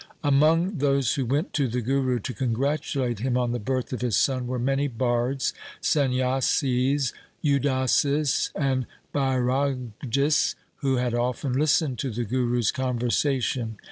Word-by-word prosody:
Among 160 +6 +3
those 140 -3 +2
who 135 -4 -1
went 145 - -1
to 140 -3 +1
the 125 +1 -2
Guru 130 +1 0
to 125 - -4
congratu 135 +4 -1
late 120 -4 -1
him 125 +2 0
on 125 -1 0
the 120 - -2
birth 130 +4 -2
of 125 - -4
his 125 -4 +1
son 130 -2 +1
were 125 0 -2
many 135 +3 +1
bards, 125 +1 0 0.3
Sanyasis, 130 0 +1 0.3
Udasis, 140 +1 +2
and 130 -3 0 0.3
Bairagis, 135 0 0 0.2
who 135 -3 0
had 125 -1 0
often 125 +2 -1
lis 145 +2 +3
tened 140 -6 -3
to 135 - -2
the 120 +1 -3
Guru's 120 -1 +1
conversation. 125 -2 -1
130 Hz, 140 wpm, -25 LUFS, 125-140 Hz, 0.3 s, Among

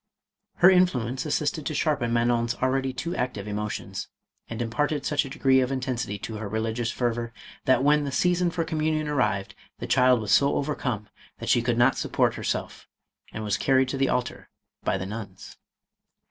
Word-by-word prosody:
Her 175 - +7
influence 135 -8 +1
assisted 150 +1 -1
to 155 - -3
sharpen 140 -8 0
Manon's 120 0 +1
already 130 +1 0
too 130 +8 -4
active 115 -5 -3
emotions, 105 0 -4 0.4
and 115 - -5
imparted 145 +5 -1
such 145 -1 +1
a - - -7
degree 135 -2 +3
of 130 0 0
intensity 125 -5 -2
to 110 +2 -6
her 105 -1 -5
religious 110 +2 -1
fervor, 120 -1 -2 0.3
that 130 0 +4
when 150 +1 +4
the 140 - -3
season 180 +4 +2
for 165 0 -1
communion 155 -1 -1
arrived, 105 -9 0 0.2
the - - -5
child 125 -1 +4
was 105 -2 -3
so 140 0 +4
overcome, 125 -7 -2 0.3
that - - -5
she 120 - +4
could 120 0 0
not 120 +2 +4
support - - +1
herself, - - -4 0.4
and 110 - -5
was 105 -1 0
carried 130 -1 +2
to 135 - -2
the 135 - +2
altar 125 -1 -2 0.3
by - - +1
the 95 - -4
nuns. 100 -2 -8
125 Hz, 175 wpm, -26 LUFS, 115-145 Hz, 0.4 s, Her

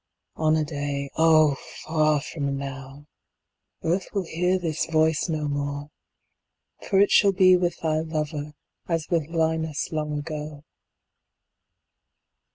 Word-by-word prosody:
On 155 0 +2
a 155 -1 +1
day 145 -2 -4
(Oh, 155 -3 +5 0.3
far 155 -2 +2
from 140 -2 -3
now!) 135 +1 -8 0.8
Earth 180 +3 0
will 195 -2 0
hear 180 +3 +1
this 165 -4 -2
voice 160 +1 +2
no 155 -2 -1
more; 145 0 -3 0.9
10 - - -11
For 195 - +4
it 200 - +4
shall 200 -1 +5
be 185 -1 +6
with 175 -1 0
thy 155 -1 +1
lover 150 -2 -3 0.3
As 165 -2 -2
with 165 -4 +1
Linus 160 -2 -1
long 150 -1 -2
ago. 150 -1 -6
155 Hz, 130 wpm, -25 LUFS, 145-165 Hz, 0.9 s, be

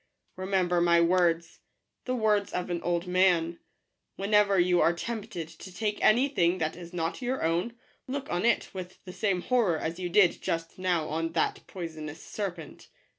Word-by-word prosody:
Remember 185 -2 +1
my 170 0 +5
words 170 -1 +2 0.2
— - - -54
the 255 - -1
words 210 -3 +1
of 180 0 -2
an 170 -1 -2
old 175 0 -1
man: 180 -2 +2 0.3
— - - -53
whenever 200 0 +3
you 175 0 +4
are 170 - +4
tempted 210 -3 -5
to 165 +3 -12
take 210 +3 -2
any 245 +6 +5
thing 180 -10 +1
that 160 -2 -2
is 170 -1 -10
not 170 +5 -3
your 255 +2 -2
own, 170 +8 0 0.3
look 275 +1 -4
on 175 +1 0
it 235 0 +1
with 185 -1 -8
the 180 - -8
same 195 -4 0
horror 230 -10 +2
as 165 +3 -4
you 180 -1 -3
did 190 -1 +4
just 165 +2 -3
now 175 -4 0
on 165 +1 -2
that - - 0
poisonous 160 -4 -7
serpent. 180 -7 -6
180 Hz, 180 wpm, -28 LUFS, 170-205 Hz, 0.3 s, my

